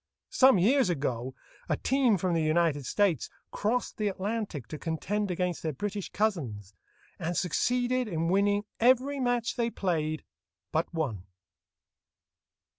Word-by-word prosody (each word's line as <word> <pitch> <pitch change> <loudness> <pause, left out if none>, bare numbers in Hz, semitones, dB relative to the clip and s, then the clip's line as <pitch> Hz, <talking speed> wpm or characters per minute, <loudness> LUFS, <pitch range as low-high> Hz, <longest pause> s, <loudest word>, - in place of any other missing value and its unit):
Some 260 -4 +6
years 235 +5 +4
ago 130 -5 -2 0.3
a - - +1
team 260 -5 +2
from 180 0 0
the 165 - +2
United 155 -3 +1
States 195 - +1 0.2
crossed 230 +4 -1
the 215 - 0
Atlantic 200 - -3
to 155 - -6
contend 200 +6 -2
against 180 -1 -1
their 160 -2 -2
British 205 +6 -4
cousins, 125 - -2 0.5
and 170 +2 -2
succeeded 245 +7 +1
in 165 -4 -1
winning 205 +3 +2 0.2
every 260 +4 +3
match 245 -2 0
they 235 -1 +1
played 155 -7 -1 0.5
but 160 0 0
one. 125 - -3
185 Hz, 130 wpm, -29 LUFS, 160-225 Hz, 0.5 s, Some